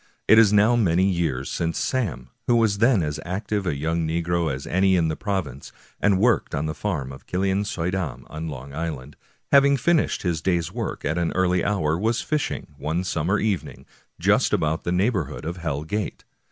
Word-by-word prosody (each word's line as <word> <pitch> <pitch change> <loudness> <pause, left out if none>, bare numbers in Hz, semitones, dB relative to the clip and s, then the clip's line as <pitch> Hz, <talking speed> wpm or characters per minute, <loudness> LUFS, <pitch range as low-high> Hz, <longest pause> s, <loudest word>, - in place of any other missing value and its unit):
It 110 - +8
is 110 -3 +6
now 105 +3 +5
many 95 -5 +3
years 80 -8 -1
since 85 -1 -2
Sam, 85 - -2 0.2
who 120 - +4
was 110 -3 +2
then 115 -5 +4
as 75 -1 -3
active 100 +2 -3
a 75 - 0
young 80 +3 -1
negro 85 0 0
as 65 +1 -5
any 95 +1 +3
in 85 -3 +2
the 80 - -2
province, 90 - -4 0.3
and 100 -2 +3
worked 110 +2 +2
on 75 - -1
the 75 - -2
farm 75 -6 -3
of 65 - -12
Killian 95 +2 0
Suydam 90 -6 -3
on 80 +1 -6
Long 70 -2 -7
Island, 75 -3 -5 0.4
having 140 0 +6
finished 165 +5 +1
his 85 -4 -1
day's 85 -2 0
work 115 0 -4
at 80 +4 0
an 85 - 0
early 90 -1 +2
hour, 85 -6 0
was 115 +3 +1
fishing, 155 -2 -3
one 80 +4 -1
still 85 -4 -2
summer 95 +7 +1
evening, 105 -5 -2 0.3
just - - +3
about 80 +1 0
the 85 - 0
neighborhood 90 - 0
of 85 +2 -4
Hell 75 -4 -3
Gate. 105 +5 -4
90 Hz, 195 wpm, -24 LUFS, 80-105 Hz, 0.4 s, It